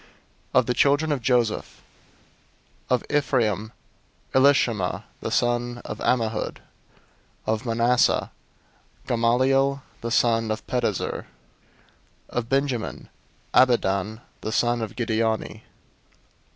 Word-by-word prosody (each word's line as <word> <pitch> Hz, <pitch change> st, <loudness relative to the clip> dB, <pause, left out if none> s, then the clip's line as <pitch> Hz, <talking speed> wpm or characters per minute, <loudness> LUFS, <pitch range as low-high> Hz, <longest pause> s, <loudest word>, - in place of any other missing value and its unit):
001:010 -, -, +8 dB
Of 125 Hz, -, +1 dB
the 125 Hz, -, 0 dB
children 145 Hz, +5 st, +3 dB
of 140 Hz, -4 st, -1 dB
Joseph: 120 Hz, -2 st, 0 dB, 1.1 s
Of 125 Hz, -1 st, +2 dB
Ephraim: 115 Hz, -8 st, 0 dB, 0.6 s
Elishama 125 Hz, -8 st, +3 dB, 0.2 s
the -, -, -4 dB
son 120 Hz, 0 st, 0 dB
of -, -, -6 dB
Ammihud. 115 Hz, -3 st, 0 dB, 0.9 s
Of 110 Hz, +3 st, -1 dB
Manasseh: 120 Hz, +2 st, +2 dB, 0.7 s
Gamaliel 130 Hz, +4 st, +2 dB, 0.2 s
the 115 Hz, -, -3 dB
son 115 Hz, -1 st, +2 dB
of 110 Hz, 0 st, -3 dB
Pedahzur. 120 Hz, -6 st, -1 dB
001:011 -, -, -7 dB, 1.0 s
Of 120 Hz, -1 st, -3 dB
Benjamin: 135 Hz, -4 st, -1 dB, 0.4 s
Abidan 110 Hz, -4 st, +2 dB, 0.2 s
the 110 Hz, -, -3 dB
son 120 Hz, +1 st, +1 dB
of 110 Hz, -, -5 dB
Gideoni. 110 Hz, -2 st, -1 dB
120 Hz, 100 wpm, -24 LUFS, 110-130 Hz, 1.1 s, 001:010